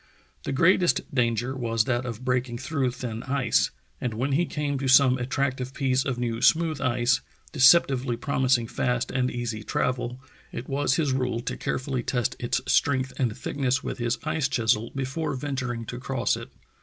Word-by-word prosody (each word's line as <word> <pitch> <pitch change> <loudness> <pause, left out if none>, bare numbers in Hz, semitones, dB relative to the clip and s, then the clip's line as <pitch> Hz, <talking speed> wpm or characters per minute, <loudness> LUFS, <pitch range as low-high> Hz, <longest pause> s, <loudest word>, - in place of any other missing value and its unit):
The - - -2
greatest 170 +4 +3
danger 120 0 0
was 115 -3 +1
that 120 +1 -1
of 120 +1 -6
breaking 125 -1 0
through 135 0 -1
thin 120 -2 -5
ice, 135 -1 +1 0.3
and 120 -3 -2
when 130 +5 -1
he 160 +5 +2
came 145 -2 -2
to 135 - -2
some 130 -1 +6
attractive 130 0 -2
piece 130 -1 +1
of 130 -3 -1
new 115 -2 -2
smooth 160 -3 +3
ice, 120 0 +2 0.3
deceptively 135 -3 +4
promising 125 -1 +1
fast 125 +2 -1
and 130 -1 +1
easy 120 -3 -4
travel, 125 +2 -2 0.3
it 120 - -6
was 140 -1 +1
his 150 -4 +1
rule 125 -3 0
to 120 - -4
care - - -2
fully 130 -1 -3
test 120 -2 -1
its 120 - -1
strength 135 -2 +1
and 120 -5 -1
thickness 135 -1 -1
with - - -5
his 120 0 0
ice 155 -4 0
chisel 115 -4 +1
before 135 +3 -2
venturing 130 -4 -3
to 125 +2 -6
cross 130 -1 0
it. - - -9
130 Hz, 175 wpm, -26 LUFS, 120-135 Hz, 0.3 s, some